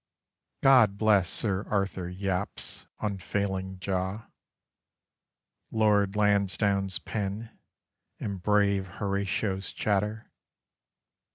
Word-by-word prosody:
God 120 -7 +6
bless 100 -4 +4
Sir 100 -2 +1
Arthur 95 -3 -1
Yapp's 95 0 -3
unfailing 95 -1 -2
jaw, 95 +4 -3 1.4
Lord 105 -2 +2
Lansdowne's 100 -1 +2
pen, 105 +1 -4 0.6
and 100 -3 -4
brave 100 -1 +2
Horatio's 100 0 -1
chatter! 105 +2 -1
100 Hz, 75 wpm, -28 LUFS, 95-105 Hz, 1.4 s, God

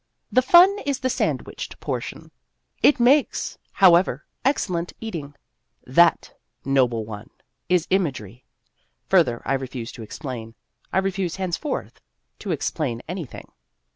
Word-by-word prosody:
The 255 - +5
fun 360 +9 +6
is 280 -2 -2
the 260 -1 0
sandwiched - - -3
portion. - - -5 0.5
It 290 - +5
makes, 265 +4 +2
however, 175 -6 +4 0.2
excellent 180 -11 0
eating. 160 -10 -6 0.5
(That, - - +3 0.3
noble 125 -5 +2
one, 105 0 -9 0.4
is 180 -2 +3
imagery. 130 - -1 0.7
Further 120 -1 +3
I - - 0
refuse 130 -3 -4
to - - -11
explain; 115 -1 -7 0.4
I - - 0
refuse 190 -2 -1
henceforth 190 - -4 0.4
to 205 - -7
explain 140 -6 -2
anything.) 170 -5 -7
170 Hz, 115 wpm, -23 LUFS, 125-200 Hz, 0.7 s, fun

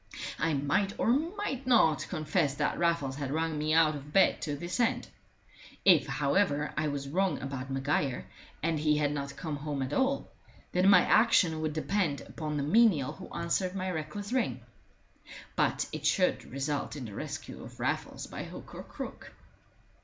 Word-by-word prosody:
I 160 0 +1
might 145 +9 0
or 230 - +2
might 310 -2 -1
not 165 - +4
confess 155 -3 0
that - - -1
Raffles 165 -6 +1
had 140 -2 -3
rung 160 +2 -1
me 155 +1 0
out 160 -2 +5
of 145 +1 -9
bed 190 +4 +4
to 150 -3 -2
this 175 - -4
end. 235 - +1 0.8
If, 180 -6 +6
however, 145 +2 +1
I 155 0 0
was 140 -1 -3
wrong 185 +6 0
about 135 -1 -5
Maguire, 135 -1 -1 0.4
and 160 -1 +1
he 150 0 +2
had 145 -1 +1
not 140 -1 -4
come 155 -4 -4
home 145 -2 -3
at 130 +2 -4
all, 270 +1 0 0.4
then 185 +2 +4
my 200 - +8
action 180 -8 +4
would 155 -1 -1
depend 155 0 0
upon 150 -2 -5
the 140 - 0
menial 165 - +4
who - - -10
answered 180 +2 -1
my 185 -1 -2
reckless 180 +7 -5
ring. 130 - 0 0.9
But - - +1
it - - -2
should - - +2
result 140 +3 -2
in 135 -4 -6
the 105 - -8
rescue - - -6
of - - -12
Raffles - - -2
by - - -6
hook - - -10
or - - -7
crook. - - -8
155 Hz, 175 wpm, -30 LUFS, 145-185 Hz, 0.9 s, my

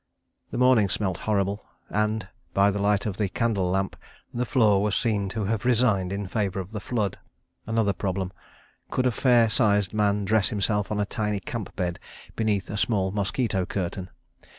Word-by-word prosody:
The - - -5
morning 125 -5 +4
smelt 95 -4 -1
horrible, 100 -1 0 0.2
and, 105 -1 -1 0.3
by 100 +1 +5
the 100 - -3
light 100 0 +2
of 100 -3 -3
the 105 -3 0
candle 100 -4 0
lamp, 95 +1 0 0.4
the 120 +1 -1
floor 105 -7 +4
was 105 -1 +1
seen 105 -4 0
to 110 +2 -3
have 110 0 -1
resigned 115 -7 +2
in 100 +1 -3
favour 95 0 -1
of 95 +1 -6
the 105 - -4
flood. 105 -1 -2 0.5
Another 110 -2 +1
problem: 95 -2 -2 0.6
Could 130 - 0
a 125 - +4
fair 120 -1 +4
sized 105 -4 +2
man 105 -1 +1
dress 110 +1 +2
himself 105 -2 0
on 105 - -1
a 105 - +1
tiny 105 0 -2
camp 105 +1 -6
bed 90 -3 -2 0.4
beneath 105 -3 0
a 105 - -3
small 100 -3 +1
mosquito 100 0 0
curtain? 90 -1 -3
105 Hz, 175 wpm, -26 LUFS, 95-110 Hz, 0.6 s, by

